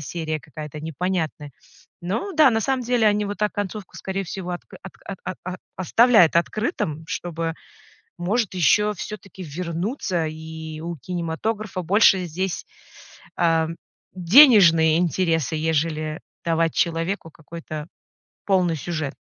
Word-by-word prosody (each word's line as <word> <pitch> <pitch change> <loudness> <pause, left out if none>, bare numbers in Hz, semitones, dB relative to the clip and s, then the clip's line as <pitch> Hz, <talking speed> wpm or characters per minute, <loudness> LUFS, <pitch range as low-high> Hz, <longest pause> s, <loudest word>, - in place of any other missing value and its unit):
серия 155 +1 -3
какая-то 150 +2 -8
непонятная. 160 -2 -3 0.6
Ну 290 - -2
да, 305 -4 +6
на 225 -1 +1
самом 265 +2 0
деле, 235 -2 +2
они 210 0 +3
вот 205 0 -5
так 210 0 0
концовку, 205 0 -5
скорее 195 0 -3
всего, 180 +1 -6
отк 175 - -7
от 190 - -9 0.3
а - - -3
а 185 0 -4 0.2
оставляют 185 -2 +5
открытым, 170 - -1
чтобы, 165 -2 -3 0.6
может, 205 +4 0
ещё 210 +5 +3
всё-таки 195 -1 -8
вернуться, 170 - -2
и 160 0 -7
у 170 +1 -5
кинематографа 180 - -3
больше 190 0 +4
здесь, 180 +3 -3 0.7
ам, 165 -1 +1 0.4
денежные 175 - +7
интересы, 165 -3 0
ежели 155 0 -1 0.2
давать 165 -1 +1
человеку 165 +1 -1
какой-то 155 -1 -8 0.6
полный 180 -4 +2
сюжет. 155 -2 -4
175 Hz, 120 wpm, -23 LUFS, 160-200 Hz, 0.7 s, денежные